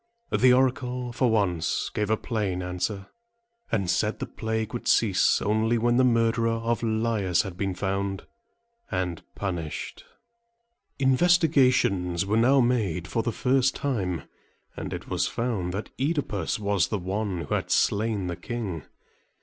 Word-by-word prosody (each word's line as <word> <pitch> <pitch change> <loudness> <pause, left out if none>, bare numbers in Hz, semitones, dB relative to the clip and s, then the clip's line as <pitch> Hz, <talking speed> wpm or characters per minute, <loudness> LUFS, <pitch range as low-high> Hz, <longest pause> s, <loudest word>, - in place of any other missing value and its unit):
The 130 0 +5
oracle 125 -1 +1
for 125 0 +2
once 90 -7 0
gave 105 -1 -1
a 110 - +2
plain 100 -7 -2
answer, 95 +2 -3 0.6
and 100 -5 0
said 105 +5 +1
that - - -32
the - - -22
plague 110 0 -2
would 120 - -5
cease 105 -5 +3
only 110 +3 +2
when 120 +1 +2
the 130 - +5
murderer 115 -1 +2
of 115 0 -1
Laius 110 -5 +1
had 95 -4 -7
been 95 0 -2
found 95 0 -2 0.6
and 90 -3 -2
punished. 85 -6 -4 0.9
Investigations 130 - +3
were 105 +2 0
now 130 +5 +5
made 105 -9 0
for 115 - -1
the 115 - -1
first 130 +3 +2
time, 95 - -2 0.5
and - - -5
it - - -6
was - - 0
found 110 -7 -2
that 100 +4 -5
OEdipus 145 -2 -1
was 100 -5 +1
the 105 - -2
one 95 0 -2
who - - -4
had - - -1
slain 105 -2 +1
the 85 -1 -3
king. 100 -7 -4
110 Hz, 150 wpm, -26 LUFS, 95-120 Hz, 0.9 s, The